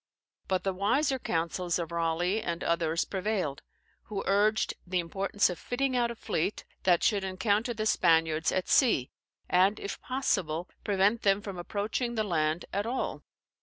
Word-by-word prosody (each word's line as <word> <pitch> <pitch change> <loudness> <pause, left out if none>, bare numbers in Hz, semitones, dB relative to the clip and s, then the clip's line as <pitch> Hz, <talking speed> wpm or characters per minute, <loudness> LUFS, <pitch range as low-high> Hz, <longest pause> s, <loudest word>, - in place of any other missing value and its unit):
But 185 -1 0
the 195 - 0
wiser 260 +9 +1
counsels 170 -1 -1
of 170 -2 -4
Raleigh 170 +5 0
and 170 -2 -3
others 165 0 +1
prevailed, 190 -7 -2 0.4
who 200 -2 -4
urged 205 +2 +2
the 185 +1 0
importance 195 +4 +1
of 180 - -5
fitting 260 +1 -1
out 240 -1 +2
a 235 - -5
fleet, 190 -2 -2 0.2
that 175 -2 +4
should 205 -3 +2
encounter 200 +5 0
the 215 0 -2
Spaniards 160 -5 +3
at 185 - -1
sea, 220 - +3 0.4
and, 190 +4 +3
if 200 - -6
possible, 180 - -1 0.2
prevent 205 +3 +2
them 195 -1 +3
from 200 -3 -7
approaching 215 +6 -2
the 220 - +1
land 160 -4 0
at 200 +3 -1
all. 255 +2 -2
195 Hz, 160 wpm, -29 LUFS, 170-215 Hz, 0.4 s, that